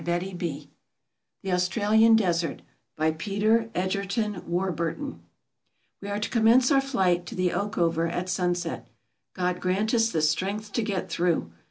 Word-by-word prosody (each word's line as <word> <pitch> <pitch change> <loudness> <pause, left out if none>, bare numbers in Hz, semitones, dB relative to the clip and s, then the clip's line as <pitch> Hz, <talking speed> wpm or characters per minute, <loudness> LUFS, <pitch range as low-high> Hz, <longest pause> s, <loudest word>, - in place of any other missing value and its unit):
MISCELLANEOUS 175 -4 -3 0.8
The 190 - -2
Australian 215 +5 +4
Desert 175 -6 0 0.3
By 155 +1 +1
PETER 210 +7 +1
EGERTON 200 +2 -1
WARBURTON 180 - -2 0.8
WE 200 - -6
are 205 - -2
to 210 - -2
commence 235 +4 +4
our 275 -1 +5
flight 185 -10 0
to - - -7
the 185 -1 +1
Oakover 170 -5 0
at 180 +1 -3
sunset. 175 -5 -2 0.5
God 180 -1 -1
grant 195 +5 0
us 225 -1 +3 0.2
strength 200 +7 -2
to 230 - 0
get 195 -4 -2
through 170 - 0
185 Hz, 135 wpm, -26 LUFS, 175-215 Hz, 0.8 s, our